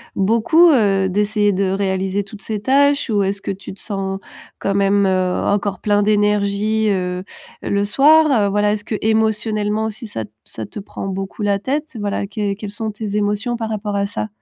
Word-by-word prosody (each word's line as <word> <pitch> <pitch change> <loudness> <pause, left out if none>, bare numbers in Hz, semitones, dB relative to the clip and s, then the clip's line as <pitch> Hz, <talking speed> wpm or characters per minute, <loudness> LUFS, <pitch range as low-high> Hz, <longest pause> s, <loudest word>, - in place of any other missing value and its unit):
beaucoup, 230 - +4
heu, 200 -9 +3
d'essayer 205 +1 +1
de 190 0 0
réaliser 195 0 -1
toutes 200 0 -13
ces 215 -2 -3
tâches? 280 +2 +3
Ou 205 -3 +2
est-ce 195 +1 -2
que - - -6
tu 190 -1 -6
te 195 - -16
sens 195 -2 -4 0.4
quand 195 - -1
même, 200 0 +3
heu, 185 -1 +1
encore 200 -1 0
plein 205 -1 +2
d'énergie, 210 +1 +1
heu, 180 -1 -2 0.4
le 200 0 0
soir? 305 +8 +5 0.2
Heu, - - 0
voilà, 205 +1 +2
est-ce 205 0 -5
qu'émotionnellement 220 -1 0
aussi 220 +2 -6
ça 110 - -5
te 105 - -22 0.2
ça 110 - -7
te - - -8
prend 195 - -7
beaucoup 195 +1 -5
la 205 -1 +2
tête? 280 +5 -3
Voilà. 200 -1 -2
Quelles 200 -1 -2
quelles 210 0 -7
sont 215 +2 -4
tes 210 -1 -4
émotions 210 +4 -1
par 225 -1 -4
rapport 210 -1 -3
à 200 0 +1
ça? 205 +1 -3
205 Hz, 190 wpm, -19 LUFS, 195-220 Hz, 0.4 s, soir